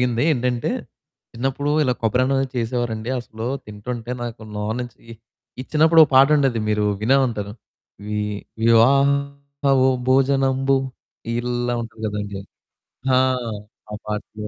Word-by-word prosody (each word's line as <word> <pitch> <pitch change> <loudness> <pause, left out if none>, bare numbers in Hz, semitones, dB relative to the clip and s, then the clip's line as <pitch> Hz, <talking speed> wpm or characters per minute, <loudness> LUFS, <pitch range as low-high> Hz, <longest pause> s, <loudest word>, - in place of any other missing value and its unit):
జరిగింది. 120 -1 +1
ఏంటంటే 125 -3 -1 0.6
చిన్నప్పుడు 135 +4 -2
ఇలా 130 -4 +2
కొబ్బరి 115 +3 +2
అన్నం 135 +1 +1
అనేది 135 -1 -1
చేసేవారండి. 115 -1 -2
అసలు 110 -1 -8 0.2
తింటుంటే 115 +3 -6
నాకు 120 -1 -6
నోర్నుంచి 110 +4 -4 0.6
ఇచ్చినప్పుడు 160 +4 +4
ఒక - - -6
పాటుండేది 135 -3 +4
మీరు 105 0 +1 0.2
వినే 125 +6 +3
ఉంటారు. 105 -4 -4 0.5
వి 105 0 -2 0.5
వివాహ 140 +4 +2 0.2
ఓ - - +4 0.2
భోజనంబు 135 0 +3 0.6
ఇల్లా 120 0 -1
ఉంటది 115 -1 -11
గదండీ! 105 -1 -4 0.8
ఆ! - - +5 0.7
ఆ - - -5
పాటలు. 105 0 -5
120 Hz, 115 wpm, -21 LUFS, 110-135 Hz, 0.8 s, ఆ